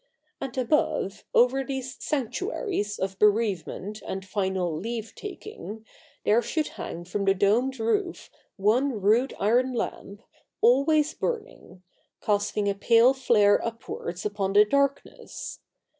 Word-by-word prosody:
And 270 -1 -6
above, 255 -5 0
over 255 +3 +4
these 265 -1 -5
sanctuaries 295 - -2
of 190 0 -3
bereavement 210 -1 +1
and 190 0 -5
final 190 -3 -1
leave 225 +5 -5
taking, 390 - -8 0.4
there 220 +3 +4
should 310 +4 -2
hang 170 +1 -7
from 200 +3 -2
the 195 0 +4
domed 235 +7 +2
roof 350 - -1 0.3
one 225 +5 +2
rude 220 +7 +2
iron 245 +5 +2
lamp, 205 -2 -5 0.4
always 295 +5 +4
burning 465 - -5 0.2
— - - -46
casting 205 0 0
a 200 - +2
pale 230 +5 +5
flare 225 -6 +3
upwards 210 -5 -5
upon 200 -2 -1
the 210 +1 +7
darkness. 280 +4 -2
225 Hz, 125 wpm, -26 LUFS, 200-270 Hz, 0.4 s, the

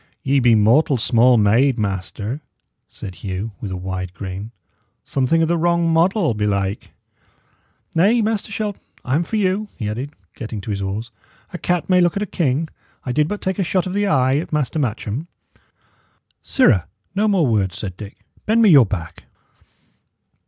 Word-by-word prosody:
"Ye 140 +1 +2
be 120 -3 +5
mortal 125 +7 +4
small 120 +2 +4
made, 115 +5 +3
master," 105 +5 -3 0.5
said 95 - -8
Hugh, 100 +3 -4
with 100 - -4
a 95 - -4
wide 95 0 -5
grin; 95 +2 -6 0.5
"something 140 +5 +1
o' - - +4
the 170 +1 0
wrong 170 0 +2
model, 170 - +2
belike. 100 -1 -1 1.0
Nay, 200 +9 +4
Master 215 -1 -2
Shelton, 205 -1 -3 0.2
I 130 - -1
am 160 +5 +2
for 195 - -5
you," 205 0 0
he 110 - -3
added, 125 +8 -4 0.2
getting 110 -4 -6
to 105 - -5
his 100 -1 -3
oars. 105 +4 -4 0.4
"A 180 - -5
cat 175 -2 -1
may 180 -1 +4
look 175 +2 +2
at 205 - 0
a - - -1
king. 160 -4 0 0.4
I 125 - -2
did 150 +3 +2
but 205 +4 -4
take 190 +1 -2
a - - +2
shot 185 0 0
of 185 - -4
the 205 +1 +1
eye 130 -5 +3
at 155 - -4
Master 150 -1 -1
Matcham." 125 +2 -3 1.1
"Sirrah, 110 - +3 0.3
no 205 +2 +1
more 195 -6 +3
words," 105 -6 0
said 95 -4 -5
Dick. 100 +1 -10 0.3
"Bend 220 +2 +3
me 210 - +6
your 135 -8 +7
back." 90 -5 -6
130 Hz, 175 wpm, -20 LUFS, 105-175 Hz, 1.1 s, your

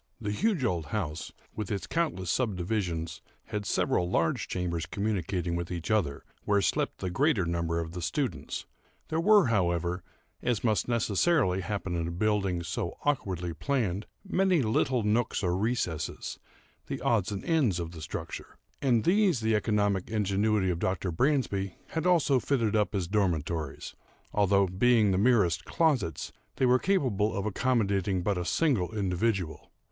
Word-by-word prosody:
The 105 -3 -3
huge 195 - +1
old 85 -8 -1
house, 85 -8 -3 0.2
with 105 -3 -4
its 100 -3 -2
countless 155 - -1
subdivisions, 90 -7 -1 0.2
had 105 -2 -4
several 90 -1 +1
large 85 -2 +1
chambers 85 -2 -2
communicating 95 -4 -1
with 85 0 -3
each 85 +4 -3
other, 85 -11 0 0.2
where 100 -1 +2
slept 95 - 0
the 95 - -2
greater 135 - +2
number 85 -1 -1
of 80 -1 -4
the 90 0 -6
students. 90 - -2 0.4
There 160 - 0
were, 205 +2 +6
however, 90 -3 +1 0.4
(as 120 -4 0
must 110 -3 +1
necessarily 115 - +2
happen 95 -2 -3
in 85 -1 -1
a - - -3
building 95 -2 0
so 80 -3 -3
awkwardly 95 - -1
planned,) 105 - -1 0.2
many 185 -5 +2
little 120 +2 +1
nooks 110 +1 +1
or 90 -1 +1
recesses, 95 -7 -2 0.5
the - - -4
odds 110 -4 +1
and 100 -2 -5
ends 135 - +2
of 85 -1 -4
the 80 -2 -9
structure; 75 - -6 0.2
and 120 -5 +3
these 190 - +3
the 110 0 +1
economic 105 -3 +1
ingenuity 105 -2 +1
of 85 - -3
Dr. 95 0 -1
Bransby 100 - 0
had 165 +2 -1
also 160 -7 +4
fitted 115 -6 0
up 105 0 +1
as 95 -4 -1
dormitories; 85 -6 -1 0.4
although, 100 -1 +4
being 105 +3 +3
the 95 - +2
merest 105 -7 +3
closets, 140 - 0 0.2
they 130 - +2
were 125 0 +5
capable 125 - +1
of 100 - -2
accommodating 100 -5 +1
but 100 -1 0
a - - -1
single 110 - +1
individual. 95 -3 -1
100 Hz, 155 wpm, -29 LUFS, 90-120 Hz, 0.5 s, were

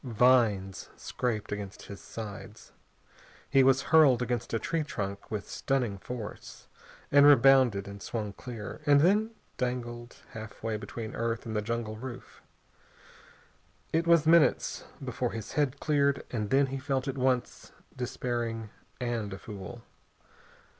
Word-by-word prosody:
Vines 115 -6 +2
scraped 115 -4 -3
against 100 -1 -6
his 100 - -9
sides. 110 0 -9 0.8
He 135 - +5
was 135 +1 +4
hurled 145 -7 +7
against 125 -1 -2
a 115 - +1
tree 165 +8 -1
trunk 100 -9 -5
with 105 -2 -4
stunning 125 -7 -1
force, 115 0 -8 0.4
and 145 0 +7
rebounded, 130 -7 +6
and 100 0 -9
swung 105 -3 -4
clear, 115 +1 -8
and 145 -1 +6
then 205 +6 +3 0.3
dangled 120 -1 -4 0.2
halfway 110 0 -5
between 110 +1 -6
earth 115 0 -2
and 110 -1 -4
the 105 - +1
jungle 110 0 -3
roof. 125 +1 -9 1.5
It 165 +1 +1
was 170 -2 +5
minutes 165 0 +3 0.2
before - - -2
his 110 -1 -6
head 145 -2 0
cleared, 140 -2 +2
and 105 -4 -2
then 140 +3 +4
he 135 - -2
felt 135 0 -1
at 135 - -2
once 130 -2 -1 0.2
despairing 120 -3 -3 0.3
and 120 -4 -2
a 95 - -5
fool. 105 +3 -9
120 Hz, 135 wpm, -29 LUFS, 110-135 Hz, 1.5 s, hurled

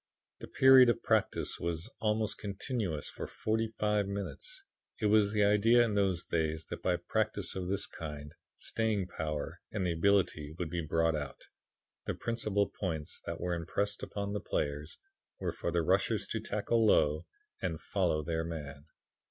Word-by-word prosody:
The - - -8
period 130 -2 +7
of 120 - 0
practice - - +1
was 85 +2 -2
almost 110 0 0
continuous 100 - -3
for - - -6
forty 110 +1 -1
five 105 -1 +1
minutes. 100 -7 -4 0.4
It - - -1
was 105 -1 +4
the 105 -1 +3
idea 105 +4 +5
in 115 -3 0
those 95 -3 +1
days 80 -1 -1
that - - -5
by 90 - +2
practice 105 +3 -1
of 95 -1 -3
this 100 +2 +1
kind, 75 -1 -7 0.2
staying 110 -4 0
power 75 -3 -4
and 95 -3 -1
ability 85 -3 +1
would 85 -3 -3
be 85 -1 -1
brought 80 +1 +1
out. 70 -3 -5 0.6
The - - -2
principal 105 -4 0
points 80 -6 -4
that 85 0 -3
were 90 0 -1
impressed 100 +5 -2
upon 100 0 -4
the 105 - -1
players 75 +1 -2 0.4
were - - -1
for - - -3
the - - +1
rushers - - +2
to - - -1
tackle 115 -1 0
low 80 -6 +3 0.3
and 85 -4 -2
follow 85 -5 0
their 80 +1 -1
man. 75 -4 -6
95 Hz, 160 wpm, -32 LUFS, 80-105 Hz, 0.6 s, period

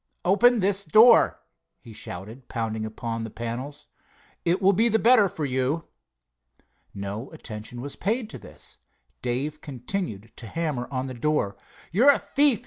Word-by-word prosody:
"Open 230 +5 +5
this 195 +1 +1
door!" 215 +8 +6 0.4
he 115 - -13
shouted, 110 +5 -8
pounding 110 -2 -3
upon 115 +1 -4
the 115 - -5
panels. 120 +6 -6 0.6
"It 175 +2 +2
will 195 0 +4
be 225 +5 +3
the 220 - +3
better 220 -3 +5
for 155 - -4
you." 130 +4 -1 1.0
No 100 +5 -5
attention 120 -5 -8
was 140 +2 -5
paid 220 +4 -1
to - - -8
this. - - -12 0.4
Dave 135 +5 -2
continued 125 - -5
to 115 - -7
hammer 150 -3 -2
on 130 -1 -2
the 130 - -5
door. 120 -5 0 0.4
"You're 235 - +5
a - - +2
thief!" 280 -6 +3
140 Hz, 150 wpm, -25 LUFS, -, 1.0 s, door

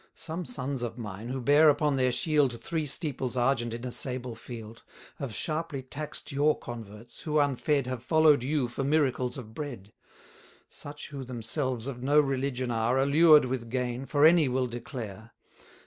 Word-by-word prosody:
Some 165 +2 -5
sons 140 - -2
of 120 -1 -4
mine, 105 -1 -7
who 130 +1 -3
bear 145 +5 +6
upon 145 0 +2
their 130 -1 +2
shield 140 -3 +1
Three 155 +5 -3
steeples 130 -3 -1
argent 120 -1 +1
in 115 +2 -6
a 125 - -4
sable 125 -1 -2
field, 115 -1 -10 0.4
Have 135 -4 -4
sharply 155 - -3
tax'd 145 +3 -5
your 145 +2 +2
converts, 115 0 -9
who 155 -1 -1
unfed 145 0 +1
Have 130 -1 -4
follow'd 155 0 +4
you 135 0 0
for 120 +3 -4
miracles 135 -4 +1
of 110 -4 -9
bread; 120 -8 -7 0.7
Such 145 0 -9
who 140 -2 -6
themselves 125 0 -3
of 130 -3 -5
no 145 +3 +4
religion 135 -3 0
are, 115 +2 +1
Allured 150 +3 +6
with 125 -2 -4
gain, 125 +1 -2
for 145 0 +4
any 165 -2 +6
will 130 0 +1
declare. 115 -3 -7
130 Hz, 165 wpm, -28 LUFS, 120-145 Hz, 0.7 s, bear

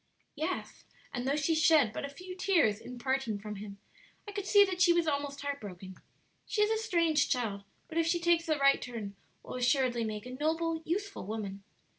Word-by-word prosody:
"Yes, 315 +5 -4 0.3
and 245 0 -3
though 275 - +2
she 300 +2 +1
shed 315 -7 +4
but 280 - -4
few 365 +5 -9
tears 335 - +2
in 250 +2 -9
parting 260 -3 -1
from 210 0 -7
him, 200 0 -8 0.5
I - - -5
could 405 -1 -4
see 405 0 +7
that 370 -2 -3
she 345 -1 +7
was 340 -1 +2
almost 285 -2 -2
heart 285 0 -3
broken. 190 -2 -8 0.5
She 420 - +2
is 420 - +2
a 445 0 0
strange 335 -8 +2
child, 210 -6 -1 0.2
but 330 0 -2
if 330 - +2
she 345 +1 +2
takes 340 -1 +2
the 310 -2 +2
right 275 -1 +4
turn, 220 -5 -6 0.3
will - - -8
assuredly 250 -1 +2
make 215 0 -4
a 250 - -7
noble, 320 +4 -1
useful 395 - -3
woman." 200 -2 -4
285 Hz, 200 wpm, -31 LUFS, 230-335 Hz, 0.5 s, see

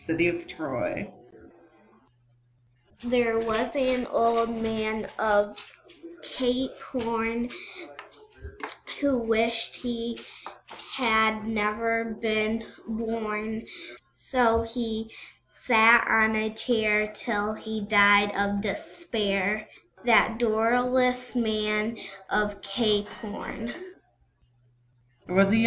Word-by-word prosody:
There 170 +1 -2 2.3
was 230 +2 -1
an 255 -3 +1
Old 230 0 +2
Man 220 -2 -3
of 210 -1 +2 0.7
Cape 255 +1 -2
Horn, 230 -1 -3 1.5
Who 280 -2 +2
wished 230 0 0
he 235 -1 -5 0.7
had 220 -3 +2
never 225 +1 -1
been 220 0 0 0.2
born; 220 -1 -4 0.5
So 230 - +2
he 225 -1 -5 0.4
sat 230 -1 +6
on 220 0 +4
a 215 0 0
Chair 215 -2 +1
till 210 -1 -2
he 220 0 -6
died 205 -1 +5
of 200 0 0
despair, 215 - -2 0.4
That 225 -1 +4
dolorous 245 +2 +1
Man 215 -1 0 0.3
of 205 -1 0
Cape 205 0 +1
Horn. 225 +2 -7
225 Hz, 75 wpm, -26 LUFS, 215-230 Hz, 2.3 s, sat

